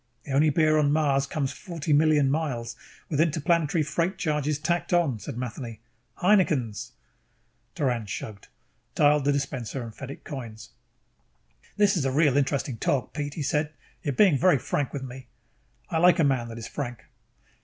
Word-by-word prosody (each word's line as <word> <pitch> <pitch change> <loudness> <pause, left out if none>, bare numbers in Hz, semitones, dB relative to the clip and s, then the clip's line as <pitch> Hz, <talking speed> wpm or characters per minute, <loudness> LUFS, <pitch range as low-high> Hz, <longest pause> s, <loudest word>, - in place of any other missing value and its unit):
"The 140 - -8
only 145 +3 +4
beer 155 0 +3
on 145 -1 +3
Mars 140 -3 +2
comes 140 -2 -2
forty 165 -5 -3
million 150 -2 +4
miles, 125 -7 -2 0.3
with 150 -1 +1
interplanetary 160 0 +1
freight 165 +6 -1
charges 150 -2 0
tacked 170 +4 -1
on," 160 -10 +2
said 115 - -7
Matheny. 120 -2 -6 0.4
"Heineken's!" 155 - +1 0.8
Doran 120 -6 -1
shrugged, 100 0 -7 0.5
dialed 145 -1 +4
the 145 - +4
dispenser 135 -3 -3
and 115 -2 -8
fed 135 +3 -8
it 140 - -9
coins. 115 -6 -8 1.1
"This 205 -1 +4
is 165 - 0
a 135 - +1
real 145 -1 +3
interesting 140 -3 0
talk, 135 -4 0
Pete," 145 -1 -4
he 155 - -3
said. 150 +2 0 0.3
"You - - -3
are - - 0
being 160 -2 +4
very 180 -4 +5
frank 135 +2 -2
with 140 -2 -5
me. 130 0 -9 0.6
I 165 - +1
like 180 +1 +6
a 165 - +3
man 130 -4 +1
that 115 0 -8
is 115 - -6
frank." 120 -2 -6
145 Hz, 170 wpm, -26 LUFS, 130-155 Hz, 1.1 s, like